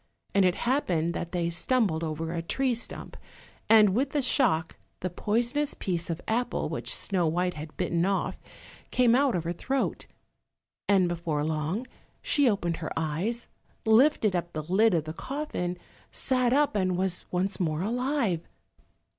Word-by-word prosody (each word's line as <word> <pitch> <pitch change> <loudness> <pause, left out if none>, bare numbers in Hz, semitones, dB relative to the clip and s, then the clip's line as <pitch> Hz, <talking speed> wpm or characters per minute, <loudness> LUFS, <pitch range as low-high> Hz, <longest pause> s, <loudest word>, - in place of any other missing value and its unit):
And 195 -1 +4
it 180 - +3
happened 180 - 0
that 170 0 -4
they 170 -2 -1
stumbled 180 -3 +1
over 160 +1 -3
a 170 - -2
tree 260 +9 0
stump, 235 - -4 0.5
and 215 -2 +7
with 260 +6 +1
the 290 0 0
shock 165 - +1 0.3
the 185 - -2
poisonous 240 +10 0
piece 175 -3 -2
of 165 0 -2
apple 240 +2 -1
which - - -1
Snow 180 -4 +1
white 180 +3 0
had 155 0 -9
bitten 170 0 0
off 195 +1 -1 0.5
came 245 -2 +4
out 270 -2 +3
of 170 - -1
her 170 +1 -2
throat. 270 +10 -2 0.8
And 190 -3 +4
before 165 -4 -2
long 160 - -2 0.3
she 285 -4 +3
opened 175 -6 -1
her - - -5
eyes, 170 +10 -2 0.4
lifted 220 -3 +4
up 175 0 -3
the 155 - -3
lid 190 +5 +3
of 160 - +1
the 155 0 -6
coffin, 220 - -4 0.3
sat 255 -2 +1
up, 285 -2 +3
and 185 -3 +1
was 185 -1 -1
once 185 +2 -1
more 160 -2 0
alive. 240 - 0
185 Hz, 160 wpm, -28 LUFS, 170-240 Hz, 0.8 s, and